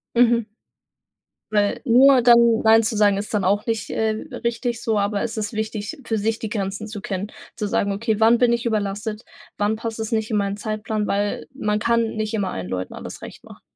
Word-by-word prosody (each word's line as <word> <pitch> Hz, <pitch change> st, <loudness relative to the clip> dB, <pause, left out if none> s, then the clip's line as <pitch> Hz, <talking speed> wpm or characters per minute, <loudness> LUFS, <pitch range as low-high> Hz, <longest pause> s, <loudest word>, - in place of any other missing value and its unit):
Mhm. 235 Hz, -2 st, +3 dB, 1.0 s
Weil 205 Hz, -1 st, +1 dB
nur 260 Hz, +1 st, +6 dB
dann 235 Hz, -1 st, +5 dB
Nein 225 Hz, 0 st, +6 dB
zu 220 Hz, +1 st, -1 dB
sagen, 205 Hz, -1 st, +3 dB
ist 205 Hz, +2 st, -5 dB
dann 205 Hz, -2 st, +1 dB
auch 200 Hz, +3 st, +1 dB
nicht, 225 Hz, -2 st, -2 dB
äh, 220 Hz, 0 st, 0 dB, 0.3 s
richtig 235 Hz, 0 st, -2 dB
so, 220 Hz, -2 st, +1 dB
aber 200 Hz, 0 st, 0 dB
es 230 Hz, -, -3 dB
ist 210 Hz, -1 st, -2 dB
wichtig, 215 Hz, +5 st, -4 dB
für 225 Hz, -1 st, -1 dB
sich 225 Hz, +2 st, 0 dB
die 220 Hz, -, -4 dB
Grenzen 200 Hz, 0 st, -3 dB
zu 210 Hz, -2 st, -7 dB
kennen, 195 Hz, +2 st, -4 dB, 0.2 s
zu 210 Hz, -, -3 dB
sagen: 200 Hz, 0 st, 0 dB
„Okay, 215 Hz, +1 st, -1 dB
wann 225 Hz, +2 st, +5 dB
bin 240 Hz, -1 st, +3 dB
ich 235 Hz, 0 st, -2 dB
überlastet? 210 Hz, 0 st, -2 dB, 0.3 s
Wann 205 Hz, +1 st, +1 dB
passt 225 Hz, 0 st, -5 dB
es 220 Hz, -, -3 dB
nicht 220 Hz, -1 st, 0 dB
in 215 Hz, -, 0 dB
meinen 200 Hz, 0 st, -1 dB
Zeitplan?“ 215 Hz, 0 st, -3 dB
Weil 205 Hz, +1 st, -1 dB
man 210 Hz, -5 st, -1 dB
kann 230 Hz, +1 st, +2 dB
nicht 215 Hz, 0 st, -3 dB
immer 200 Hz, -3 st, -1 dB
allen 90 Hz, -1 st, -5 dB
Leuten 90 Hz, 0 st, -4 dB
alles -, -, -8 dB
recht -, -, -10 dB
machen. -, -, -15 dB
215 Hz, 210 wpm, -22 LUFS, 205-230 Hz, 1.0 s, nur